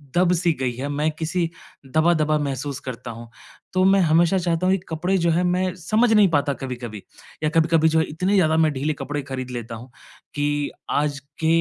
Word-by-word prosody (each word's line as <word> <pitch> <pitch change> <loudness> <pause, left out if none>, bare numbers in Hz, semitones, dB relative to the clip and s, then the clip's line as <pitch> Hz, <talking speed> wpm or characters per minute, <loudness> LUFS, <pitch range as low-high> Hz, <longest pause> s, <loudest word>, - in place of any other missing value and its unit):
दब-सी 175 -1 +3
गई 130 -2 0
है। 135 +4 -4
मैं 150 +2 0
किसी 165 +1 -1 0.4
दबा-दबा 155 +1 +2
महसूस 140 -1 -3
करता 120 -2 -7
हूँ। 115 0 -10 0.4
तो 185 - +2
मैं 195 0 +5
हमेशा 170 +3 +3
चाहता 175 +1 0
हूँ 190 - +4
कि 195 - -3
कपड़े 180 +4 0
जो 170 0 +2
हैं 175 +3 +2
मैं 180 +1 0
समझ 215 +7 +1
नहीं 210 -2 +6
पाता 145 -1 +1
कभी-कभी। 120 -6 -6 0.4
या 155 - +2
कभी-कभी 160 0 +4
जो 160 0 +2
है 160 - +2
इतने 180 +6 -1
ज़्यादा 160 -4 +3
मैं 160 -1 +3
ढीले 145 +3 -1
कपड़े 145 0 -4
ख़रीद 130 -1 -5
लेता 120 -1 -6
हूँ 120 +3 -11 0.5
कि 145 0 -1 0.2
आज 145 -1 0 0.2
के 160 - 0
155 Hz, 195 wpm, -23 LUFS, 140-175 Hz, 0.5 s, नहीं